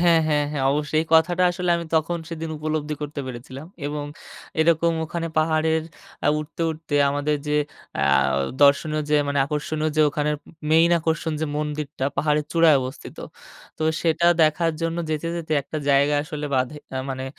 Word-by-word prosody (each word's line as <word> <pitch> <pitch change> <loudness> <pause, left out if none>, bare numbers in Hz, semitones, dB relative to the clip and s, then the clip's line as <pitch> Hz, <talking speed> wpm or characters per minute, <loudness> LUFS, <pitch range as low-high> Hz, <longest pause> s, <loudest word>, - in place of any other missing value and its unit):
হ্যাঁ, 170 -2 +5
হ্যাঁ, 150 -1 +2
হ্যাঁ। 140 -3 -2
অবশ্যই 150 +1 0
এই 160 - -10
কথাটা 175 +3 +4
আসলে 180 0 -2
আমি 170 - -4
তখন 165 +2 +1
সেদিন 165 -1 -5
উপলব্ধি 155 0 -2
করতে 145 0 -4
পেরেছিলাম। 130 +3 -8 0.2
এবং 145 0 -3 0.6
এরকম 165 +1 +3
ওখানে 165 +1 -4
পাহাড়ের 160 0 +2 0.4
আ 145 - +4
উঠতে, 155 +2 -5
উঠতে, 160 -1 -6 0.2
আমাদের 145 +1 0
যে 150 - 0 0.5
আ - - +1 0.6
দর্শনীয় 150 +2 +4
যে 150 - +5
মানে 140 - 0
আকর্ষণীয় 155 +1 -2
য্‌ - - +4
ওখানের, 150 +1 -1 0.3
মেইন 165 +2 +5
আকর্ষণ 160 0 -1
যে 160 - 0
মন্দিরটা 150 -2 -3
পাহাড়ের 150 0 +1
চূড়ায় 165 -3 +6
অবস্থিত। 130 +2 -7 0.6
তো - - -3 0.2
সেটা 170 +1 +2 0.2
দেখার 165 +2 +2
জন্য 165 0 -1
যেতে, 155 +1 -2
যেতে 160 -2 -4
একটা 155 +3 -5
জায়গা 140 +1 +4
আসলে 150 0 -5
বাধে। 130 +3 0 0.2
আ - - -2
মানে 130 0 -4
155 Hz, 165 wpm, -23 LUFS, 145-165 Hz, 0.6 s, চূড়ায়